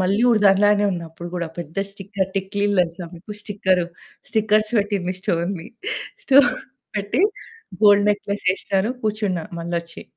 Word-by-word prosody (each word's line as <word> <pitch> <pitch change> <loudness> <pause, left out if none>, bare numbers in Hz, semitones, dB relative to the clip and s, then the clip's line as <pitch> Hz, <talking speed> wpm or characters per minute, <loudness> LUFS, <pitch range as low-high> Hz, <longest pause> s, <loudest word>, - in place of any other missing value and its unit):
మళ్ళీ 195 +4 +2
ఊరు 220 -3 +3
దానిలానే 205 +1 +5
ఉన్నప్పుడు 170 0 -7
కూడా 170 -2 -2
పెద్ద 165 +1 -7
స్టిక్కర్ 195 -1 -4
టిక్లీలు 200 +1 0
తెలుసా 175 0 -2
మీకు? 175 +5 -13
స్టిక్కర్ 190 -3 +1 0.5
స్టిక్కర్స్ 215 0 +2
పెట్టింది. 200 -3 -1
స్టోన్‌ది. 170 0 -2 0.6
స్టోన్‌ది 280 +1 +6 0.4
పెట్టి 205 - 0 0.6
గోల్డ్ 205 -1 +7
నెక్లెస్ 200 0 -3
ఏశ్నరు. 195 +3 -1
కూర్చున్నా 210 -5 -1
మళ్లొచ్చి. 170 0 -4
195 Hz, 125 wpm, -22 LUFS, 175-205 Hz, 0.6 s, గోల్డ్